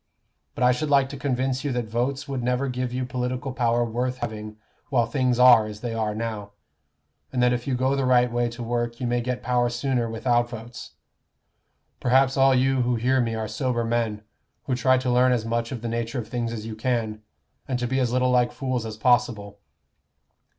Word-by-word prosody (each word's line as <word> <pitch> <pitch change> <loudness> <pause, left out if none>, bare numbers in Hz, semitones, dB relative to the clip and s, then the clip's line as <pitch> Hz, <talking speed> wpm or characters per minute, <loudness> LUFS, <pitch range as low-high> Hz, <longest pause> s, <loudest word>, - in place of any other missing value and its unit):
But - - -1
I 125 - +6
should 145 +5 -2
like 140 -2 +4
to 140 - -7
convince 130 -1 -1
you 145 - -1
that 120 -1 -1
votes 125 +6 -2
would 135 -2 -3
never 125 +3 0
give 125 -1 -3
you 125 +1 -2
political 125 +1 -3
power 120 -1 +1
worth 125 +2 -2
having 110 -3 -6 0.3
while 125 -5 +2
things 125 +1 0
are 120 -3 +7
as 105 0 -9
they 120 -2 -3
are 110 -2 -1
now, 110 -2 -5 0.8
and 130 - -2
that 125 0 +4
if 120 +2 -3
you 130 - +1
go 130 +2 +1
the 135 - 0
right 125 -1 +3
way 120 0 0
to 120 +1 -7
work 120 0 -2
you 125 - -3
may 120 0 0
get 125 +1 -3
power 120 0 +1
sooner 120 -1 -1
without 120 +1 +1
votes. 120 0 -9 1.1
Perhaps 130 +1 +3
all 135 0 +5
you 130 0 +2
who 125 0 +1
hear 130 +3 +2
me 115 -1 -1
are 110 -1 -3
sober 120 +2 -1
men, 115 -2 -1 0.4
who 130 - -2
try 130 +1 +3
to 130 -1 -1
learn 125 +1 +4
as 115 -3 -1
much 115 0 -2
of 120 -3 -6
the - - -2
nature 115 +2 -3
of 115 -3 -4
things 115 0 -3
as 110 -2 -6
you 110 -1 -6
can, 110 -2 -2 0.5
and 130 - -1
to 125 - -2
be 130 +2 0
as 125 -2 +1
little 125 0 +2
like 125 -1 +3
fools 130 -5 -3
as 110 -1 -7
possible. 110 -4 +1
120 Hz, 215 wpm, -24 LUFS, 115-130 Hz, 1.1 s, are